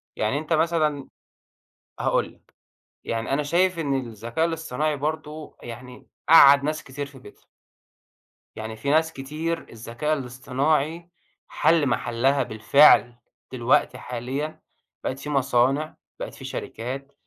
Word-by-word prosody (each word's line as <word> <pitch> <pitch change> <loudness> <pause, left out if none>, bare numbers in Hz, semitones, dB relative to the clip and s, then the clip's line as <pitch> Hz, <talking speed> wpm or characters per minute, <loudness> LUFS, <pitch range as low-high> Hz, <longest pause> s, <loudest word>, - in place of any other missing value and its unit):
يعني 110 +6 0
أنت 155 +2 -2
مثلًا 155 -3 +1 0.9
هاقول - - 0
لك، - - -33 0.5
يعني 115 +3 -3
أنا 150 +2 +1
شايف 175 +3 +1
إن 140 -3 -1
الذكاء 115 +8 -2
الاصطناعي 155 -2 -2
برضو 155 +1 -5
يعني 125 +1 -10 0.2
قعّد 140 -3 +8
ناس 155 +1 -2
كتير 140 +2 -6
في 140 -1 -14
بيتها. 115 - -16 1.1
يعني 110 0 -6
في 110 +6 -4
ناس 160 +2 +2
كتير 155 +5 -4
الذكاء 115 +7 -3
الاصطناعي 140 +6 -1 0.4
حل 160 -1 +2
محلها 130 +3 +1
بالفعل، 120 +2 +5 0.4
دلوقتي 125 -1 +1
حاليًا 130 +6 -5 0.4
بقِت 130 - -3
في 150 - -7
مصانع، 135 +2 +1 0.2
بقِت - - -6
في - - -11
شركات 135 +4 -6
140 Hz, 120 wpm, -24 LUFS, 125-155 Hz, 1.1 s, قعّد